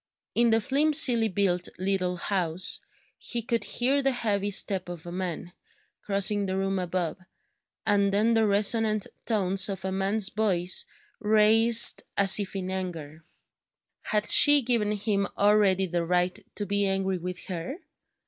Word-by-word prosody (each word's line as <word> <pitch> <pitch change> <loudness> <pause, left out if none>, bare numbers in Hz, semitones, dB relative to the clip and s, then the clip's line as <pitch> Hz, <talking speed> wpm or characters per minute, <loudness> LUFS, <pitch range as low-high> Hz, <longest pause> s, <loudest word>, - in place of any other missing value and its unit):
In 235 0 +2
the 225 0 +3
flimsily 270 -2 +3
built 185 -3 -1
little 185 -1 -2
house, 180 -1 -1 0.4
he 235 -2 -4
could 230 -1 -2
hear 265 +6 0
the 270 - +1
heavy 205 -5 -2
step 190 -2 -1
of 175 -2 -9
a 175 - -8
man, 175 -1 -6 0.5
crossing 200 0 0
the 190 0 -3
room 195 0 -2
above, 180 -2 -3 0.7
and 200 -1 +1
then 215 +4 +1
the 225 -1 +2
resonant 215 +1 +1 0.2
tones 195 -2 +1
of 190 -1 -6
a 190 - -3
man's 195 +2 -1
voice 185 -5 0 0.3
raised 220 +2 +4 0.2
as 200 +1 +5
if 200 -1 -5
in 185 -1 -4
anger. 165 -5 -6 0.8
Had 210 -1 0
she 290 -2 +7
given 225 -3 +1
him 200 -1 -2
already 200 -2 +2
the 175 -1 -3
right 180 +2 -1 0.2
to 205 - -3
be 200 0 -1
angry 190 -1 -2
with 180 +1 -7
her? 175 - -6
200 Hz, 150 wpm, -26 LUFS, 185-215 Hz, 0.8 s, she